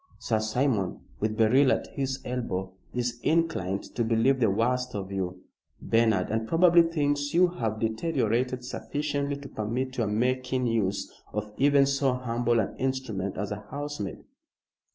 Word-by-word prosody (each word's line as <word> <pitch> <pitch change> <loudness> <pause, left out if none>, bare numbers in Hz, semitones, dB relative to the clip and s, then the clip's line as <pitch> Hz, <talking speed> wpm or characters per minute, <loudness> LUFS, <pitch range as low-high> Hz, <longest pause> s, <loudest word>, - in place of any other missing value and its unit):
Sir 110 -2 0
Simon, 110 -2 0 0.2
with 110 +1 -1
Beryl 130 +5 +5
at - - +1
his 135 -1 -2
elbow, 95 -7 -3 0.2
is 120 -1 -2
inclined 155 - +1
to 120 - 0
believe 115 +4 +3
the 115 -4 +4
worst 125 +5 0
of 100 -1 -4
you, 95 -1 -3 0.4
Bernard, 115 -2 +2
and 110 0 -1
probably 170 +2 +6
thinks 145 -3 0
you 180 +1 +6
have 110 -10 -3
deteriorated 125 0 0
sufficiently 145 +2 -2
to 140 0 -9
permit 125 +5 -3
your 115 -3 +1
making 125 +4 0
use 105 -4 0 0.2
of 105 0 -4
even 140 0 +5
so 135 -1 +1
humble 120 -1 0
an 105 - -1
instrument 130 -8 -2
as 100 +2 -3
a 105 0 -6
housemaid." 145 -7 -5
125 Hz, 150 wpm, -27 LUFS, 110-140 Hz, 0.4 s, probably